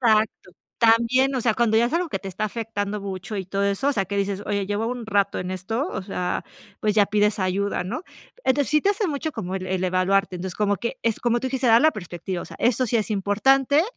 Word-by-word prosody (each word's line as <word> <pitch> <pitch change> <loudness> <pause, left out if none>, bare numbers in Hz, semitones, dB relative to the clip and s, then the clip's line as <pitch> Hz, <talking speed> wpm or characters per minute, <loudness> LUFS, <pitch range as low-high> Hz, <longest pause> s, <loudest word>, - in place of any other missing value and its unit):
Exacto. 220 -5 +2 0.3
También, 235 +4 +4
o - - 0
sea, 225 -2 +2
cuando 225 -2 +2
ya 230 - +5
es 250 - -5
algo 345 +1 0
que - - -2
te - - -10
está 190 +3 -6
afectando 210 -2 -3
mucho 195 +1 -5
y 190 - -3
todo 195 +2 -2
eso, 200 +8 +1
o 285 - +3
sea, 195 -5 0
que 200 +2 -4
dices: 200 0 -1
"Oye, 200 -2 -1
llevo 205 +3 -1
un 245 -2 -5
rato 200 -2 +1
en 180 +1 -4
esto", 225 - -2
o 195 - -4
sea, 180 -2 -3 0.4
pues, 210 -1 +1
ya 205 -2 +5
pides 210 +1 +2
ayuda, 190 0 0
¿no? 235 - -4 0.4
Entonces, 275 +1 +2
sí 305 0 +4
te 400 - +3
hace 405 0 0
mucho 310 0 -2
como 190 -8 -5
el 185 -1 -4
el 185 0 -1
evaluarte. 185 +1 +1
Entonces, 180 0 -5
como 205 -1 +1
que 240 +3 -4
es, 230 -2 0
como 240 0 +2
tú 260 - -3
dijiste: 260 -1 0
"Dar 230 +1 +7
la 315 +1 +5
perspectiva". 175 -1 -5
O - - -8
sea, - - -11
eso 250 +2 +2
sí 235 - +1
es 220 0 -1
importante, 265 +9 +3
210 Hz, 250 wpm, -24 LUFS, 195-245 Hz, 0.4 s, Dar